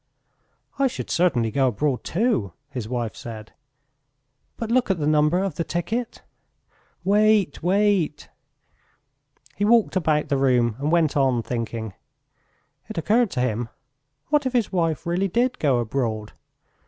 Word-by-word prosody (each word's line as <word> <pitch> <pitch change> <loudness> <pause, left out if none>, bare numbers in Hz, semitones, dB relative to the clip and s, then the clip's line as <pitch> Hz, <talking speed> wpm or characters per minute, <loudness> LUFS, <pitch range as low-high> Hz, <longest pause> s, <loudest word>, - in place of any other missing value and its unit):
"I 275 - +4
should 255 - -6
certainly 125 -11 +2
go 135 +1 +2
abroad 130 +3 -1
too," 170 - 0 0.2
his 125 -6 -5
wife 120 -3 -3
said. 110 -2 -9 1.0
"But 230 -1 -4
look 250 -2 +2
at 190 - +2
the 150 - -2
number 150 +4 +3
of 195 -6 -3
the 165 - 0
ticket!" 220 +9 -3 0.8
"Wait, 205 -3 +3
wait!..." 190 -3 +1 1.3
He 205 - -2
walked 225 0 +3
about 155 -4 +1
the 140 - +2
room 125 -4 +2
and 145 +2 -1
went 165 -4 +2
on 130 -4 +2
thinking. 115 -3 -4 1.0
It 220 - -7
occurred 220 +7 +2
to 125 - -1
him: 115 -1 -1 0.6
what 295 -2 +2
if 260 - -3
his 235 -5 +1
wife 165 -5 0
really 175 +3 0
did 245 +7 0
go 140 -5 +2
abroad? 115 -3 -2
155 Hz, 140 wpm, -23 LUFS, 125-205 Hz, 1.3 s, I